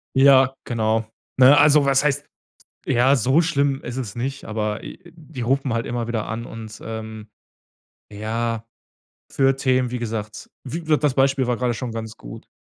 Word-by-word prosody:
Ja, 135 -1 +5
genau. 110 -1 0 0.3
Ne? 130 +3 +7
Also, 150 -1 +5
was 140 0 +3
heißt 145 0 0 0.6
ja, 130 +1 +4
so 130 +7 +3
schlimm 140 -4 0
ist 120 - -6
es 115 -7 -5
nicht, 135 +3 -4
aber, 105 -1 -3
äh, - - -9 0.2
die 150 -6 -9
rufen 135 +1 0
halt 115 0 -1
immer 120 -1 -3
wieder 115 -2 -2
an 115 +2 -4
und, 110 -1 -9
ähm 110 -1 -7 0.8
ja, 115 +2 -3 0.7
für 135 -1 +2
Themen, 130 -2 +1
wie 125 - -2
gesagt 110 -2 -5 0.2
wie 160 +5 -6
wird 155 -1 +2
das 145 -3 +3
Beispiel 135 0 +2
war 125 - +1
gerade 125 -1 0
schon 120 +1 -5
ganz 115 0 -6
gut. - - -11
125 Hz, 170 wpm, -22 LUFS, 115-135 Hz, 0.8 s, Ne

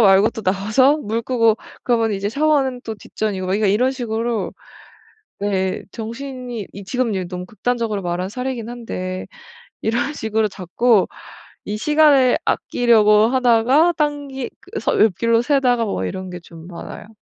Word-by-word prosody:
말고 195 0 +6
또 230 - -7
나와서 215 +9 +3
물 230 -5 -2
끄고 230 -2 +2 0.3
그러면 230 -3 +1
이제 200 +1 -2
샤워는 280 -2 +1
또 220 - -5
뒷전이고 205 -2 -4
막 - - -3
그러니까 210 +2 +2
이런 220 +7 +3
식으로 230 -5 -2 0.9
네 190 -2 -1
정신이 240 -1 -6
이 200 - -9
지금 245 +1 -1
예 190 - -1
너무 180 0 -6
극단적으로 230 -1 -2
말한 180 +1 -2
사례이긴 250 0 -4
한데 185 -6 -5 0.6
이런 240 +7 0
식으로 220 -3 0
자꾸 200 +3 +2 0.6
이 210 +1 -4
시간을 295 -2 +4
아끼려고 220 -3 +3
하다가 255 +6 +4
딴길 285 -4 -2
그래서 - - -2
옆길로 230 +3 +3
새다가 250 -3 +2
뭐 95 - -2
이런 185 - -5
게 180 - -6
좀 165 -1 -13
많아요. 210 +4 -10
225 Hz, 320 characters per minute, -20 LUFS, 200-250 Hz, 0.9 s, 말고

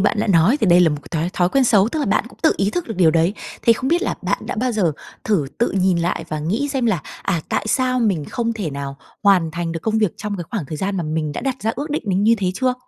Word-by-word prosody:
bạn 205 +2 +2
đã - - 0
nói 195 - +4
thì 215 - +2
đây 175 0 +6
là 175 - +5
một 150 - -1
cái 165 - -1
thói 175 +3 -1
thói 175 -1 +2
quen 270 +5 +2
xấu, 210 -3 +4
tức 310 - -3
là - - -1
bạn - - +2
cũng - - -19
tự 315 - +5
ý 200 +1 +1
thức 350 +5 -3
được 225 - -3
điều 170 -4 +5
đấy. 165 +5 +2 0.3
Thế 230 - +6
không 255 +3 -2
biết 345 +5 +2
là - - -1
bạn - - 0
đã - - -4
bao 250 +2 0
giờ 180 -8 +1 0.3
thử 190 -10 +1
tự 235 - +2
nhìn 185 -2 +2
lại 170 +1 -1
và 155 - -3
nghĩ 210 - -1
xem 265 -4 0
là, 190 -8 +1 0.2
à, 175 -5 0
tại - - -1
sao 255 +1 +1
mình 195 -10 +1
không 230 -1 -2
thể 205 -8 -4
nào 140 0 -5 0.3
hoàn 185 -5 +4
thành 165 +1 -3
được 165 - -4
công 220 0 0
việc 210 -6 +1
trong 210 -1 -4
cái 175 - -5
khoảng 195 - -3
thời 155 - -5
gian 195 +4 -2
mà 175 - -1
mình 155 -1 -2
đã - - -4
đặt 270 -1 -2
ra 225 - 0
ước 290 +3 -4
định 300 - -1
đến 195 +1 +1
như 225 +2 +5
thế 185 -2 0
chưa? 255 +1 +1
200 Hz, 305 wpm, -20 LUFS, 170-230 Hz, 0.3 s, đây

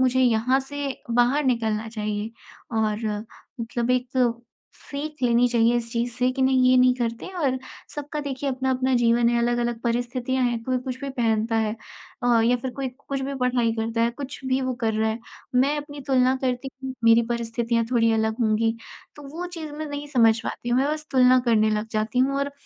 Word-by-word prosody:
मुझे 260 0 +3
यहाँ 250 +1 +3
से 285 +1 -5 0.3
बाहर 250 +5 +3
निकलना 225 -3 0
चाहिए 210 -1 -3 0.5
और 215 +1 0 0.5
मतलब 235 +1 -2
एक 250 0 +1 0.7
सीख 295 0 -7
लेनी 240 0 +4
चाहिए 235 0 +3
इस 230 -1 -3
चीज 235 +1 -1
से 250 +1 +1
कि 265 0 -1
नहीं, 260 -1 +4
ये 255 - +5
नहीं 255 0 +5
करते 235 -2 -3
और 265 -5 +1 0.4
सबका 295 +1 -4
देखिए 280 -1 -3
अपना-अपना 260 0 0
जीवन 235 0 +3
है, 240 - +2
अलग-अलग 240 0 0
परिस्थितियाँ 245 +2 -1
हैं 240 -2 -1
कोई 255 0 0
कुछ 255 0 -5
भी 280 - -4
पहनता 225 -3 0
है 220 -1 +1 0.5
अ, 240 -1 +4
या 245 +2 +3
फिर 255 +1 -4
कोई 270 -1 -2 0.2
कुछ 275 -1 -2
भी 275 +1 -3
पढ़ाई 245 -2 +2
करता 225 +1 -1
है, 235 - +2
कुछ 265 +2 -8
भी 260 0 +1
वो 260 -1 -1
कर 225 -2 +1
रहा 220 0 +1
है। 220 - -3 0.4
मैं 275 +4 +3
अपनी 290 -1 -7
तुलना 260 -1 +4
करती 255 +1 -1 0.2
हूँ 260 - -4
मेरी 230 0 +6
परिस्थितियाँ 235 0 -1
थोड़ी 230 -2 +3
अलग 220 +1 0
होंगी। 225 0 +2 0.4
तो 295 - -11
वो 335 +5 -5
चीज 330 -4 -7
मैं 310 +1 -5
नहीं 290 0 -5
समझ 230 -5 +4
पाती 240 - -5
हूँ, 240 +1 +3
मैं 275 - +1
बस 305 0 -5
तुलना 255 -1 +5
करने 215 -2 +4
लग 215 +1 -1
जाती 220 +2 -1
हूँ 270 +2 +2
और 280 0 -2
245 Hz, 200 wpm, -24 LUFS, 230-265 Hz, 0.7 s, मेरी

